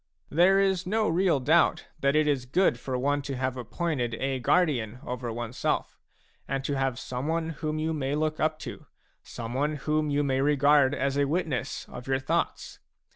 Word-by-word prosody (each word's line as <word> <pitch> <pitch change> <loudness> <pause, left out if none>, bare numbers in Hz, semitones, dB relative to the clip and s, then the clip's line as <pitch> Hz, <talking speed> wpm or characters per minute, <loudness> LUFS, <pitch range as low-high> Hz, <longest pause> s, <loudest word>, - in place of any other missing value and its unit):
There 180 +5 +5
is 190 -2 +1
no 215 +2 +1
real 170 -2 +2
doubt 155 +6 +3
that 140 0 +2
it 155 0 +3
is 135 -4 0
good 155 -3 +2
for 130 +1 -3
one 145 +3 +1
to 140 -1 -5
have 130 0 -2
appointed 125 -1 -2
a 135 +2 -2
guardian 125 -7 +1
over 125 -1 -4
oneself, 120 +1 -2 0.5
and 135 0 -2
to 145 - -1
have 135 -2 0
some 130 +2 -4
one 165 0 -1
whom 155 -1 -3
you 160 +1 -1
may 140 -2 -1
look 155 0 -1
up 155 0 +1
to, - - -8 0.3
someone 130 +6 -3
whom 150 +1 0
you 145 0 +1
may 135 -1 +1
regard 145 -1 +4
as 140 +1 -1
a 140 - +3
witness 150 -5 -2
of 125 +1 -9
your 135 0 +2
thoughts. 130 0 -2
145 Hz, 180 wpm, -27 LUFS, 130-155 Hz, 0.5 s, There